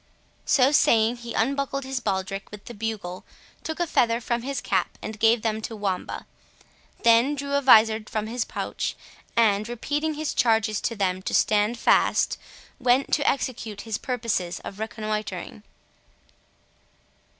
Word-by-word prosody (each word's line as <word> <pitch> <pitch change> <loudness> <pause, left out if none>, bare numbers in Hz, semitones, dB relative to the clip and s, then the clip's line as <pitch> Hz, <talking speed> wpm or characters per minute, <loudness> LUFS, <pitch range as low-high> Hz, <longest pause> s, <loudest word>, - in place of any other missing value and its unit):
So 265 -1 +4
saying 230 -5 +4
he 235 -1 -7
unbuckled 275 +3 0
his 265 0 -3
baldric 195 -2 -3
with 210 -1 -11
the 240 - -8
bugle, 205 -5 -5 0.4
took 320 +1 -5
a 345 - +2
feather 235 -7 +2
from 235 0 -2
his 270 +1 -3
cap, 190 -6 -1
and 220 -1 -7
gave 225 0 +4
them 220 -1 -1
to 225 - -5
Wamba; 195 -3 -3 0.8
then 235 +5 +5
drew 280 0 -4
a 280 - +3
vizard 220 -4 +5
from 215 -1 -2
his 235 +2 -2
pouch, - - -4 0.4
and, 215 -1 +3
repeating 295 +6 -2
his 305 0 -3
charges 220 -3 +2
to 230 - -2
them 185 -2 -1
to - - -2
stand 210 +2 +2
fast, - - +2 0.4
went 255 +2 +2
to 290 -2 +3
execute 230 -6 -3
his 220 -2 -4
purposes 230 -8 -2
of 200 - -9
reconnoitring. 215 -3 -4
225 Hz, 150 wpm, -25 LUFS, 210-255 Hz, 0.8 s, then